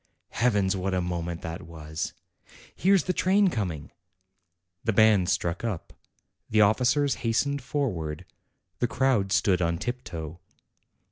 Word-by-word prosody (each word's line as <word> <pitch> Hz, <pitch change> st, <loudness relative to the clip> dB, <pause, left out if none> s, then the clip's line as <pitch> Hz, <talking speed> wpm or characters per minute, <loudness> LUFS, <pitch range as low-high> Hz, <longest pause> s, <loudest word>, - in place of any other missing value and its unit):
Heavens, 105 Hz, -5 st, +2 dB
what 95 Hz, 0 st, -1 dB
a -, -, +1 dB
moment 85 Hz, -1 st, -3 dB
that 85 Hz, 0 st, -5 dB
was! 80 Hz, -2 st, -6 dB, 0.6 s
Here's 190 Hz, -2 st, +3 dB
the 185 Hz, -, -1 dB
train 195 Hz, +2 st, +3 dB
coming!" 90 Hz, -, -4 dB, 0.9 s
The 115 Hz, -, +1 dB
band 105 Hz, -4 st, +5 dB
struck 85 Hz, +3 st, -1 dB
up; 105 Hz, -8 st, -4 dB, 0.6 s
the 110 Hz, -, +2 dB
officers 125 Hz, +5 st, +3 dB
hastened 140 Hz, +5 st, 0 dB
forward; 90 Hz, -, -3 dB, 0.5 s
the 120 Hz, -, +2 dB
crowd 120 Hz, -6 st, +1 dB
stood 95 Hz, -2 st, +2 dB
on 85 Hz, -1 st, +1 dB
tiptoe. 85 Hz, -9 st, -5 dB
100 Hz, 125 wpm, -27 LUFS, 85-125 Hz, 0.9 s, band